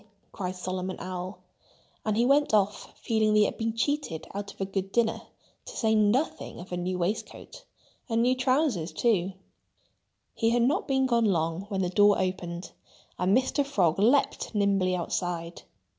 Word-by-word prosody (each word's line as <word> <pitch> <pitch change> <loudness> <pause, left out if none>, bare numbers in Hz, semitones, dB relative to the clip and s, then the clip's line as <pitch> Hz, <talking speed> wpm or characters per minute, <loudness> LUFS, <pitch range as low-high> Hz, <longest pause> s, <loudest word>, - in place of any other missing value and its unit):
cried 185 -1 -4
Solomon 185 0 -4
Owl. 185 +1 -5 0.7
And 215 -1 0
he 235 - +3
went 280 -3 +4
off 205 0 0
feeling 220 -2 +1
that - - +4
he 210 - +6
had - - -3
been 225 0 -1
cheated 285 - -1
out 200 0 -5
of - - -20
a 195 - 0
good 195 0 -3
dinner—to 230 0 -3
say 220 -2 +2
nothing 220 +8 +1
of 175 - -10
a 180 - -2
new 180 +1 -2
waistcoat—and 215 +4 -5
new 250 +1 +3
trousers, 255 - +1
too. 195 -6 +1 1.0
He 225 - +1
had 235 0 +2
not 260 +5 +1
been 265 -1 +2
gone 235 -3 +2
long 170 0 0
when 195 -2 -1
the 180 - 0
door 205 +2 +4
opened. 180 -1 -3 0.5
And 190 +5 +3
Mr. 260 +2 +1
Frog 190 - +1
leaped 240 +1 +2
nimbly 195 -3 +2
outside. 170 -1 -3
205 Hz, 160 wpm, -27 LUFS, 185-235 Hz, 1.0 s, he